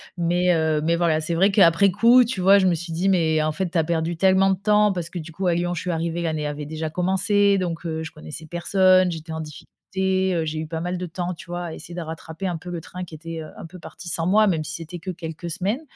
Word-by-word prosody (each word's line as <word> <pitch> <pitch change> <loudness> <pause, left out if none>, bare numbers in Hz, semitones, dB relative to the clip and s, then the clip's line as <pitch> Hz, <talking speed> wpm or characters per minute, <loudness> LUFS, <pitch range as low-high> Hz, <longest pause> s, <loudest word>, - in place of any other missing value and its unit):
Mais 175 +1 +2
heu, 160 -2 +1
mais 165 +2 +2
voilà, 165 -2 +1
c'est 160 +2 -3
vrai 190 +4 +4
qu'après 195 0 +5
coup, 235 +7 +6
tu 235 -4 -4
vois, 195 +2 +6
je 190 - +3
me 175 - +3
suis 165 0 -6
dit: 180 +4 +1
«Mais 160 -4 +2
en 155 0 0
fait, 175 +4 -3
tu 175 - -1
as - - +3
perdu 165 +1 -1
tellement 190 +2 +4
de 190 - 0
temps», 210 +1 +3
parce 175 -3 -4
que - - -7
du 165 -1 -7
coup 185 +3 -3
à 175 - +2
Lyon, 175 +1 -1
je 170 - -4
suis 180 - -2
arrivée, 165 +1 -2
l'année 155 -3 -2
avait 150 0 -4
déjà 160 +1 -4
commencé 200 +3 +2
donc, 175 -2 -3
heu, 160 -1 -3
je 160 - -7
connaissais 155 -1 -9
personne, 185 +2 +3
j'étais 160 0 -7
en 160 0 -4
difficulté, 150 -2 -10 0.7
heu, 165 -1 0
j'ai 155 0 -3
eu 160 - -4
pas 160 +1 -4
mal 180 +1 -2
de 180 - -4
temps, 180 +1 -4
tu 170 - -12
vois, 175 0 -4
à 165 - -6
essayer 170 - -10
de 175 - -4
rattraper 160 +2 -6
un 175 -2 -2
peu 180 +2 -10
le 175 -1 -4
train 180 +3 -8
qui 170 - -11
était, 165 +1 -7
heu, 155 - -9
un - - -8
peu 175 +3 -11
parti 175 +2 -11
sans 165 -1 -1
moi, 210 +3 +4
même 165 -5 +1
si 160 +2 -6
c'était 165 +1 -7
que 185 +3 -5
quelques 170 -1 -7
semaines. 200 - -2
170 Hz, 280 wpm, -23 LUFS, 160-185 Hz, 0.7 s, coup